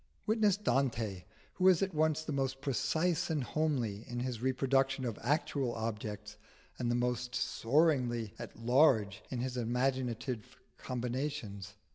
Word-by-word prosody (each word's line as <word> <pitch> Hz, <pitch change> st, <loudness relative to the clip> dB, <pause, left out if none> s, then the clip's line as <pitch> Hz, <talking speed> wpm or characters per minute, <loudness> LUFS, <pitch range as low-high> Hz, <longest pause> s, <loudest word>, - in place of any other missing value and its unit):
Witness 215 Hz, -3 st, +3 dB
Dante, 115 Hz, -, 0 dB, 0.3 s
who 185 Hz, -, +2 dB
is 185 Hz, -1 st, +6 dB
at 190 Hz, -1 st, -2 dB
once 155 Hz, 0 st, +2 dB
the 155 Hz, -, -4 dB
most 135 Hz, -1 st, -1 dB
precise 155 Hz, +6 st, 0 dB
and 155 Hz, -4 st, 0 dB
homely 125 Hz, -9 st, -1 dB
in 120 Hz, -1 st, -3 dB
his 125 Hz, -3 st, -3 dB
reproduction 135 Hz, +1 st, +1 dB
of 115 Hz, -4 st, -3 dB
actual 135 Hz, -1 st, 0 dB
objects, 105 Hz, -2 st, -4 dB, 0.4 s
and 120 Hz, -1 st, 0 dB
the 120 Hz, -, +2 dB
most 125 Hz, 0 st, -1 dB
soaringly 125 Hz, -5 st, +2 dB
at 120 Hz, -, -8 dB
large 115 Hz, -4 st, +3 dB
in 125 Hz, -2 st, -3 dB
his 125 Hz, 0 st, -3 dB
imaginative 125 Hz, -1 st, -1 dB, 0.2 s
combinations. 120 Hz, -5 st, -4 dB
125 Hz, 135 wpm, -33 LUFS, 115-145 Hz, 0.4 s, is